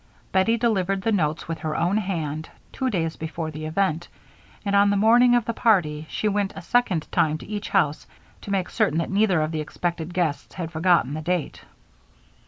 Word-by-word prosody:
Bettie 210 +5 +3
delivered 195 -5 0
the 225 - +1
notes 160 -6 0
with 165 -1 -4
her 155 -1 -3
own 180 +5 +1
hand, 160 -7 -3 0.2
two 260 -1 -1
days 165 -7 -1
before 160 0 -4
the 155 +1 -6
event, 170 0 0 0.6
and 200 0 +1
on 200 0 +5
the 200 - +2
morning 240 +4 +5
of 240 -2 +1
the 230 - -2
party 160 -10 +1
she 215 - -1
went 205 -1 0
a 195 - -7
second 190 -8 +1
time 155 -1 +2
to - - -11
each 205 0 -5
house 150 -2 +1 0.3
to - - -9
make 195 -2 -1
certain 150 - +1
that 165 - -1
neither 195 -4 +3
of 155 - -2
the 155 -1 -2
expected 170 +2 -3
guests 160 -5 -2
had 170 -3 -5
forgotten 165 -4 +2
the 155 - -4
date. 175 -1 -3
180 Hz, 195 wpm, -24 LUFS, 155-205 Hz, 0.6 s, on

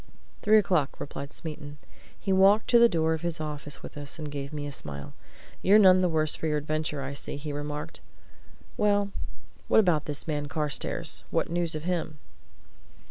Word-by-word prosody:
"Three 215 +1 +5
o'clock," 175 -9 +1
replied 140 0 -6
Smeaton. 150 -2 -7 0.4
He 195 - 0
walked 195 +3 +5
to 240 - +7
the 235 0 +7
door 160 -3 +1
of 160 - -3
his 170 -2 -2
office 150 -2 -5
with - - -9
us, 145 +2 -4
and 155 - -6
he - - -9
gave 140 0 -5
me 145 -1 -4
a 145 - -5
smile. 70 - -8 0.5
"You're 200 +3 +6
none 185 -3 +7
the 180 - +2
worse 155 -2 +2
for 160 - -3
your 150 -1 +1
adventure, 150 -1 -2
I 135 +1 -5
see," 140 - -5
he 145 0 -5
remarked. 150 +1 -5 0.8
"Well, 205 -1 +2 0.6
what - - +5
about 175 -8 +3
this 145 +1 -3
man 145 -2 -2
Carstairs 150 0 -1
what - - -1
news 170 -2 -1
of 155 - -5
him?" 170 -3 -2
155 Hz, 190 wpm, -27 LUFS, 145-180 Hz, 0.8 s, to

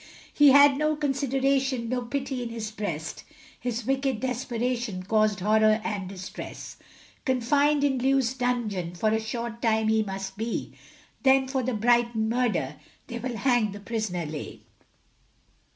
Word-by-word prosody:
He 290 -1 +7
had 285 0 +7
no 305 0 +2
consideration, 270 -3 0
No 250 +1 -1
pity 265 +1 -3
in 240 - -4
his 225 -2 -5
breast, 170 -8 -5 0.4
His 245 -2 -3
wicked 270 -2 0
desperation 245 -4 -2
Caused 215 0 +1
horror 215 +2 +4
and 200 -4 -3
distress 185 -1 -8 0.5
Confined 280 +3 +2
in 270 -3 +2
Lewes 265 -1 +2
dungeon, 230 -9 -2
For 215 +5 +1
a 220 +1 +1
short 230 +1 -5
time 220 -1 +2
he 220 0 +3
must 195 -1 -5
be, 225 +2 -3 0.5
Then 265 -1 +4
for 265 0 -1
the 255 -1 -2
Brighton 235 0 +2
murder, 220 - 0 0.3
They 235 - -6
will 240 -1 -4
hang 240 -4 +2
the 205 - -8
prisoner 205 -5 -3
Leigh. 150 -1 -7
235 Hz, 145 wpm, -26 LUFS, 215-265 Hz, 0.5 s, He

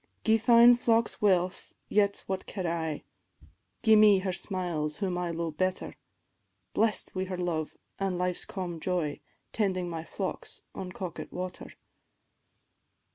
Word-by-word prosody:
"Gie 225 0 +4
fine 235 +1 +7
focks 230 -2 +1
wealth, 185 -3 +1
yet 200 -1 +1
what 190 -1 -4
care 185 -3 -3
I, 160 -2 -2 0.8
Gie 220 -1 +7
me 210 -2 +7
her 185 0 -2
smiles 175 -6 -2
whom 190 -3 -1
I 175 -1 -2
lo'e 170 -1 -2
better; 185 +3 -1 0.8
Blest 220 -2 +1
wi' 185 0 -2
her 185 -1 -4
love 170 -3 -2 0.2
an' 195 -2 -1
life's 180 0 -1
calm 175 -3 -5
joy, 170 -5 -1 0.3
Tending 185 -4 0
my 165 -1 -4
flocks 190 +3 -5
by 185 - -6
Coquet 180 -1 -6
water. 180 0 -5
185 Hz, 135 wpm, -29 LUFS, 175-200 Hz, 0.8 s, fine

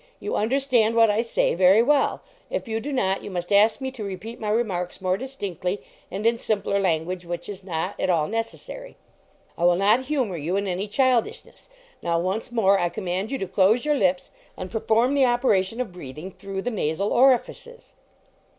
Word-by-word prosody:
You 420 - -3
understand 235 -1 +2
what 225 -2 +5
I 210 +2 +1
say 230 - 0
very 185 +5 +5
well; 285 +2 +2 0.3
if - - -3
you 225 0 -2
do 290 +6 -5
not, 195 -8 0
you - - -6
must 175 0 -5
ask 210 +2 +4
me 265 -1 -4
to 250 -5 -7
repeat 205 +4 -7
my 215 - -3
remarks 200 -6 -1
more 185 -1 0
distinctly 200 - -4 0.3
and 200 +3 -5
in 230 0 +3
simpler 200 -3 0
language, 180 0 -1
which 175 0 -6
is 200 -2 -7
not 180 +1 -4
at - - 0
all 160 -4 +2
necessary. 230 - -6 0.6
I - - -1
will 175 0 +5
not 210 +7 +3
humor 255 - -1
you 165 +5 -2
in 200 +1 0
any 190 +3 -2
childishness. 250 +1 -1 0.3
Now, 170 -1 0
once 190 +7 -2
more, 200 -4 +3
I 175 - +1
command 190 +1 -3
you 275 - -2
to 195 - -4
close 205 +8 +3
your 300 - +2
lips 185 -7 0 0.3
and 185 0 -6
perform 230 +3 +2
the 275 -2 +4
operation 235 -4 +1
of 250 -6 -3
breathing 155 +2 -8
through 195 0 -6
the 245 - -2
nasal 195 -1 -1
orifices." 265 - +1
205 Hz, 190 wpm, -24 LUFS, 185-240 Hz, 0.6 s, what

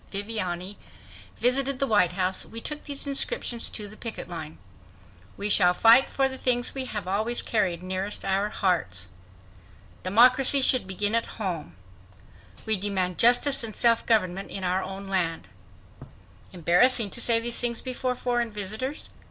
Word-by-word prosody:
Viviani, 200 -2 -4 0.6
visited 270 +2 +1
the 275 - 0
White 205 -8 +2
House, 185 0 -1
we 230 - -8
took 300 +5 -7
these 285 -1 -6
inscriptions 270 -4 +1
to 210 -2 -6
the 210 - -12
picket 225 -4 -7
line: 160 -3 -8 0.8
WE 200 - -3
SHALL 180 -3 +4
FIGHT 230 +6 +5
FOR 270 -1 +1
THE 265 0 -7
THINGS 245 -1 +1
WE 265 -1 -5
HAVE 210 -7 -6
ALWAYS 215 +5 -1
CARRIED 185 -6 -1
NEAREST 185 +2 -3
OUR 195 +2 0
HEARTS 95 - -1 0.9
DEMOCRACY 255 +7 +4
SHOULD 255 -6 +3
BEGIN 205 +2 -1
AT 230 0 0
HOME 180 -8 -5 0.9
WE 220 -1 0
DEMAND 185 -2 -2
JUSTICE 245 +3 +6
AND 220 -2 -7
SELF 230 -1 +2
GOVERNMENT 195 -4 0
IN 195 - -6
OUR 185 +1 0
OWN 195 +1 -8
LAND 175 -4 -2 1.0
Embarrassing 195 +6 +3
to 240 - +2
say 230 -1 +4
these 235 0 -2
things 235 -1 -1
before 255 0 -3
foreign 240 -1 -2
visitors? 215 +7 -5
210 Hz, 150 wpm, -25 LUFS, 185-245 Hz, 1.0 s, JUSTICE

